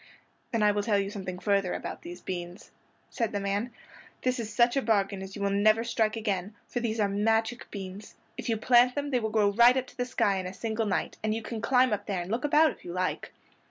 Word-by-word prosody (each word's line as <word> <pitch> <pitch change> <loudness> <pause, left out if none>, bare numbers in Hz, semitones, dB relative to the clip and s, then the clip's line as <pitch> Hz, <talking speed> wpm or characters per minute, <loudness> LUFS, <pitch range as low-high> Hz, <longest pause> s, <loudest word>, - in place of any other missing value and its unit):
"Then 230 -3 +1
I 210 - +5
will 205 0 0
tell 205 0 +1
you 200 0 -1
something 185 -3 -5
further 200 -1 +1
about - - -6
these 175 +1 -9
beans," 175 0 -6 0.4
said 230 -4 -1
the 205 - 0
man. 200 +4 -2 0.5
"This 255 -1 0
is 220 -2 -4
such 240 +1 +3
a 275 - +2
bargain 200 -4 +1
as 190 0 -8
you 200 - -4
will 200 - +1
never 215 +3 +3
strike 225 -2 0
again; 205 -2 -2
for 245 - -3
these 230 -2 -2
are 205 - +3
magic 225 +4 0
beans. 195 0 -8 0.2
If - - -5
you 225 - +1
plant 245 +2 +4
them 285 0 -2
they 250 - +2
will 220 -1 -2
grow 210 -2 +3
right 240 +4 +6
up 260 - 0
to - - -17
the 245 - -1
sky 200 -5 +1
in 185 -1 -3
a 185 - -8
single 220 +1 -2
night, 180 -5 -1
and 215 0 0
you 225 - -4
can 225 0 -5
climb 255 -2 +3
up 205 0 -3
there 190 -3 -1
and 180 - -8
look 235 +3 -1
about 305 +2 +5
you - - -5
if - - -20
you 175 - -6
like." 185 0 -2
215 Hz, 255 wpm, -28 LUFS, 195-235 Hz, 0.5 s, right